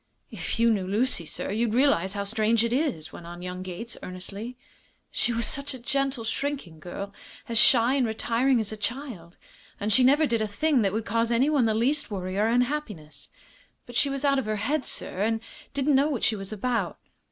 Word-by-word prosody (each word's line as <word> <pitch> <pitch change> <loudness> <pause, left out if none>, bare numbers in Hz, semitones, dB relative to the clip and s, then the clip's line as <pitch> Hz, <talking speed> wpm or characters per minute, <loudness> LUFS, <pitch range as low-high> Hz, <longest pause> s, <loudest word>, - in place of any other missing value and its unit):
"If - - -3
you 230 0 +5
knew 190 -3 -2
Lucy, 205 -4 +1
sir, 165 - -3
you'd 225 +1 0
realize 240 -9 +3
how 200 -1 -2
strange 220 +2 +2
it 235 0 0
is," 255 - -1
went 170 - -10
on 175 +1 -9
young 180 0 -5
Gates, 185 +6 -6
earnestly. 200 +6 -7 0.5
"She - - 0
was 230 -1 0
such 280 +2 -1
a - - -9
gentle, 270 0 -1
shrinking 225 - -3
girl, 195 +4 -7 0.3
as 230 -2 +1
shy 240 +2 +6
and 265 -4 +2
retiring 235 +3 +1
as 220 -2 -2
a 215 - -6
child. 220 - -5 0.4
And 210 +1 +1
she 255 - +5
never 285 +5 +5
did 230 -5 0
a 215 - 0
thing 265 +6 +2
that 195 -2 +2
would 220 +2 -2
cause 230 +2 0
anyone 265 +2 +3
the 220 -1 +1
least 260 +7 +1
worry 185 -2 -4
or 215 - +3
unhappiness. 230 - -2 0.6
But 245 - -11
she 280 - +3
was 275 +1 -2
out 275 -1 +3
of 265 - -3
her 215 0 -1
head, 265 +7 -1
sir, 185 - 0
and 225 +2 +1 0.4
didn't 280 +1 +2
know 275 +3 +4
what 270 -7 -2
she 220 - +3
was 195 -1 -6
about. 215 -3 -1
230 Hz, 210 wpm, -26 LUFS, 200-265 Hz, 0.6 s, shy